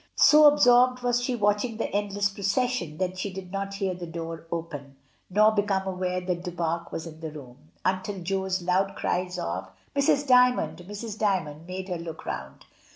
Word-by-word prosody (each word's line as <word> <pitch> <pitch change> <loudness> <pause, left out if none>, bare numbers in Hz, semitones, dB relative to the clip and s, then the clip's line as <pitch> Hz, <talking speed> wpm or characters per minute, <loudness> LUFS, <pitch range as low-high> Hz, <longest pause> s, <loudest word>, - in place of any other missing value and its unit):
So 300 0 +7
absorbed 250 -3 +5
was 245 0 +2
she 245 0 -1
watching 210 +1 +1
the 225 - -2
endless 205 0 0
procession 200 - -1
that 185 0 -2
she 200 +1 -3
did 185 -1 -8
not 195 0 -3
hear 195 -2 -1
the 175 -1 -7
door 165 0 -6
open, 145 -5 -5 0.3
nor 210 +3 +5
become 205 -2 0
aware 180 -1 -2
that 180 -1 -3
Du 180 - -4
Pare 170 0 -2
was 165 - -4
in 160 -1 -10
the 160 -1 -5
room, 125 - -12 0.2
until 190 +2 -1
Jo's 190 0 -1
loud 185 +2 +1
cries 180 0 -1
of 95 - -3 0.3
"Mrs. 280 0 +3
D3anond! 250 -8 +3
Mrs. 210 +1 -6
Dymond!" 165 -6 -1
made 185 +1 -5
her 180 -3 -3
look 165 -1 -8
round. - - -6
190 Hz, 180 wpm, -27 LUFS, 170-210 Hz, 0.3 s, So